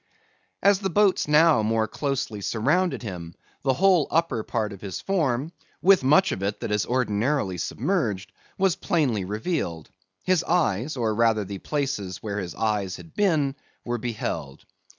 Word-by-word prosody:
As 200 -1 +5
the 195 -1 -1
boats 200 -2 +3
now 150 -4 +5
more 110 0 +1
closely 125 -4 -3
surrounded 145 - 0
him, 85 -5 -7 0.3
the 135 - +2
whole 185 -3 +4
upper 165 -8 +1
part 110 -1 -2
of 100 - -12
his 100 -2 -5
form, 155 -6 0 0.3
with 190 -5 +5
much 175 +8 +4
of 95 - -3
it 100 +2 -2
that - - -3
is 105 -1 0
ordinarily 120 -4 0
submerged, 110 - -1 0.3
was 190 -2 +2
plainly 125 - 0
revealed. 100 - -3 0.3
His 185 -2 +2
eyes, 145 - 0
or 115 -3 0
rather 110 -2 +2
the 100 0 -6
places 130 - -2
where 105 -1 -3
his 90 -3 -5
eyes 105 -4 -1
had 165 - -13
been, 155 -9 +1 0.3
were 120 0 -2
beheld. 110 - -4
120 Hz, 155 wpm, -25 LUFS, 105-165 Hz, 0.3 s, As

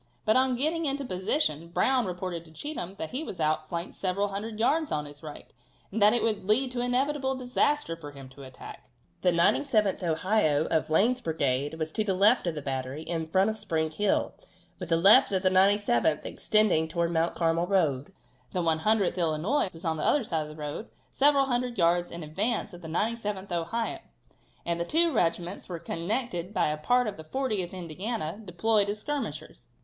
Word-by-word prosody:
But 215 - +3
on 260 0 +3
getting 315 +6 0
into 280 -1 -1
position 185 - -1
Brown 250 +7 +1
reported 180 -2 -4
to 160 - -16
Cheatham 195 - -5
that 160 - -5
he 275 +5 -3
was 195 - -7
out 155 0 0
flanked 170 +1 -4
several 200 +2 -1
hundred 215 +2 -5
yards 300 +7 +1
on 150 -1 -1
his 145 0 -11
right, 150 -2 -10 0.4
and 215 +2 -3
that 205 +1 +7
it 240 - +1
would 215 -4 0
lead 250 +6 +2
to 245 -1 -2
inevitable 265 +2 0
disaster 255 - 0
for 160 -3 -9
him 140 -2 -11
to 135 +2 -14
attack. 130 -1 -11 0.3
The 180 - +3
97th 205 +4 +2
Ohio, 160 -2 +1
of 160 - 0
Lane's 230 +11 +2
brigade, 145 - -1
was 160 -1 -4
to 215 - -1
the 195 -3 0
left 205 +2 +4
of 170 - -1
the 150 - -5
battery, 135 +2 -4
in 165 -1 -3
front 190 +6 +2
of 220 - -8
Spring 160 -2 -1
Hill, 205 +5 0 0.5
with 180 -3 -6
the 165 - +3
left 195 +5 +6
of 190 -1 0
the 185 - +3
97th 190 - +3
extending 210 -7 +2
towards 170 +1 -1
Mount 165 +1 +1
Carmel 165 +1 +1
road. 160 -6 +1 0.4
The 180 - 0
100th 175 +5 +2
Illinois 175 - +1
was 165 +2 -12
on 160 -1 0
the 150 - -3
other 290 - +3
side 165 -7 -1
of 150 - -6
the 150 - -10
road, 150 +8 -6 0.2
several 280 0 +4
hundred 245 -2 -1
yards 175 0 +2
in 170 -1 -7
advance 205 +7 -2
of 175 - -11
the 165 - -8
97th 205 +2 -2
Ohio, 225 - -2 0.7
and 170 0 -1
the - - +1
two 330 - +3
regiments 175 -2 -1
were 175 - -4
connected 185 +3 -3
by - - +2
a 150 - -2
part 245 +11 +2
of 210 -2 -4
the 160 - -8
40th 210 -1 -2
Indiana 185 +2 -4
deployed 205 +3 +1
as 205 - -2
skirmishers. 290 +4 -5
185 Hz, 195 wpm, -28 LUFS, 160-225 Hz, 0.7 s, that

